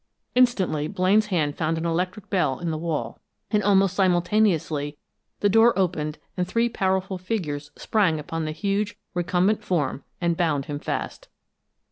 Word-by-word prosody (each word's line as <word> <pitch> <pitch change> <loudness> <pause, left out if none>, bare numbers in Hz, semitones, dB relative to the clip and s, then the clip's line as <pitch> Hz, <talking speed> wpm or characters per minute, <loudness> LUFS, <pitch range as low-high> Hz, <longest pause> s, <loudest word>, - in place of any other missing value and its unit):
Instantly 195 -12 +2
Blaine's 200 +3 +2
hand 155 -7 0
found 160 0 -1
an 160 - -3
electric 180 +4 -2
bell 155 -9 +1
in 170 -2 -3
the 155 - -2
wall, 155 -9 -3 0.3
and 210 -2 +3
almost 195 -2 +3
simultaneously 175 -6 +1 0.4
the 205 - +4
door 225 +3 +5
opened 160 -5 0 0.2
and 180 -1 -1
three 230 +5 +1
powerful 190 -3 -1
figures 160 -8 -3
sprang 185 -8 +1
upon 160 +2 -4
the 155 - -2
huge, 200 +5 -1 0.2
recumbent 180 +4 +1
form 150 -6 -1 0.2
and 170 -1 +1
bound 155 -5 0
him 145 -1 -4
fast. - - -4
180 Hz, 150 wpm, -24 LUFS, 155-200 Hz, 0.4 s, door